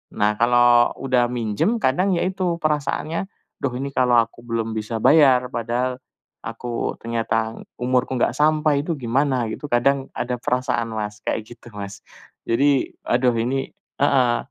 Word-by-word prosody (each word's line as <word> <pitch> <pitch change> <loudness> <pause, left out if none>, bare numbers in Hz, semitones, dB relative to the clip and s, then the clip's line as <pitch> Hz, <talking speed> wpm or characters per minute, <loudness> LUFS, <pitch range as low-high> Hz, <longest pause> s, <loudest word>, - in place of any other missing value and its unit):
Nah, 105 +1 +2
kalau 120 0 +5
udah 125 -2 +2
minjem 115 - 0
kadang 185 +5 +1
ya 170 - 0
itu 185 -2 -1
perasaannya 155 +2 -1 0.4
"duh 135 - +1
ini 140 +1 -3
kalau 125 -2 +4
aku 115 +1 -3
belum 115 -1 -2
bisa 110 +1 -3
bayar, 135 -5 +5
padahal 125 +2 -2 0.5
aku 115 +1 -4
ternyata 115 -1 -1 0.2
umurku 125 +1 0
nggak - - +2
sampai 150 -1 +2
itu 165 - -1
gimana," 130 +1 +1
gitu. 150 - -6
Kadang 135 +3 +2
ada 125 +1 -2
perasaan 120 -3 -1
Mas, 105 -1 -4
kayak 110 - -2
gitu 115 - -18
Mas. 100 -1 -7 0.5
Jadi, 135 +3 +2
aduh 125 0 +2
ini 130 +4 -1 0.3
heeh 130 -4 +3
125 Hz, 145 wpm, -22 LUFS, 115-140 Hz, 0.5 s, kalau